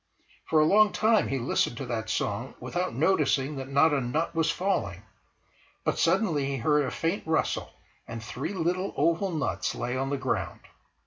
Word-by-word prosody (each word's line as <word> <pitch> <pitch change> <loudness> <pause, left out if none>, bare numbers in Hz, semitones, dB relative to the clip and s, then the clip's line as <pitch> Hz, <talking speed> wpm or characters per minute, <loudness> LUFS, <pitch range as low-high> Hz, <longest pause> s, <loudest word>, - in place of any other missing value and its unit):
For 155 - +4
a 155 - +5
long 210 +5 +5
time 220 0 +3
he 135 - -1
listened 120 -1 0
to 135 - -4
that 115 -2 -3
song 110 +4 -2
without 175 -8 -3
noticing 150 -2 +1
that 135 0 -6
not 145 +3 +4
a 140 - +1
nut 150 +8 -1
was 165 -1 +1
falling. 165 - -1 0.8
But - - -1
suddenly 165 -5 +2
he 135 -1 -2
heard 150 +4 +2
a - - -2
faint 165 +9 -1
rustle 160 0 0 0.4
and 115 -1 -7
three 145 - -5
little 180 +2 -1
oval 170 +4 +2
nuts 160 -5 -2
lay 125 +1 -3
on 135 +1 -1
the 140 - -1
ground. - - -2
150 Hz, 180 wpm, -27 LUFS, 130-170 Hz, 0.8 s, a